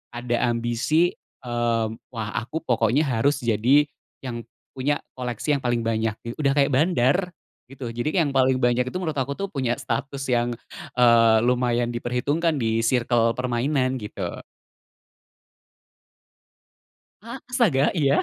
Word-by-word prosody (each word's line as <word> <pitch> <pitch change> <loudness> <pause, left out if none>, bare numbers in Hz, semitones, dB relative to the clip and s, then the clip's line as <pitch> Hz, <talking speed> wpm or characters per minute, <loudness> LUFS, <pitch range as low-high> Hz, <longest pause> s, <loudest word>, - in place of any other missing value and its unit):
Ada 120 0 0
ambisi, 120 +9 +1 0.3
eee, 120 -1 0 0.3
wah 110 -3 -4
aku 155 +8 -5
pokoknya 120 +4 +2
harus 135 +3 +1
jadi 120 +6 +4 0.4
yang 120 -2 -5 0.3
punya 140 +3 0 0.2
koleksi 125 +3 -2
yang 135 - -3
paling 120 -1 0
banyak 110 -1 0
gi 115 - -5
udah 140 -2 +2
kayak 140 0 +3
bandar 140 -1 +3 0.5
gitu. 135 -2 -8
Jadi 135 +10 -2
yang 145 -5 +2
paling 130 0 +4
banyak 125 0 +2
itu 180 - -4
menurut 160 -5 -3
aku 140 +1 -2
tuh 200 - -2
punya 130 -3 -1
status, 140 0 -3
yang, 120 -1 0 0.4
eee, 115 -2 +6
lumayan 120 -1 +1
diperhitungkan 145 +7 0
di 115 -2 0
circle 115 -1 +2
permainan 130 +2 0
gitu. 95 -4 -5 2.8
A 235 +4 -7
astaga? 205 - +3
Iya? 140 -3 +2
125 Hz, 130 wpm, -24 LUFS, 120-140 Hz, 2.8 s, eee